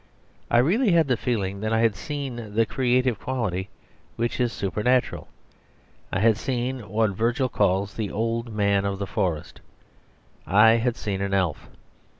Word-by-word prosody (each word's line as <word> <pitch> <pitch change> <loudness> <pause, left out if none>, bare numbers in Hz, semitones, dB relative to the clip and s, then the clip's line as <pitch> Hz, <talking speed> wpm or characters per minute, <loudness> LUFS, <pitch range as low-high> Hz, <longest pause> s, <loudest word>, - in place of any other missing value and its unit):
I - - +3
really 190 - +3
had 165 -3 +4
the 125 - +2
feeling 100 -5 -2
that 110 +2 -2
I 115 0 +2
had 115 -3 +2
seen 120 -3 -6
the 115 0 +4
creative 125 -1 +1
quality; 100 -8 -2 0.5
which 120 +2 -2
is 120 -2 +1
supernatural. 120 +5 0 0.8
I 95 - 0
had 110 -1 +4
seen 125 -3 -3
what 110 +1 +1
Virgil 120 +6 0
calls 100 -2 +1
the 110 -3 -3
Old 115 +2 -2
Man 100 -2 +1
of 100 -1 -2
the 100 - -3
Forest: 85 -5 -3 0.9
I 105 +4 +6
had 120 0 0
seen 100 -5 -3
an 100 0 0
elf. 90 -6 -1
115 Hz, 155 wpm, -25 LUFS, 100-125 Hz, 0.9 s, I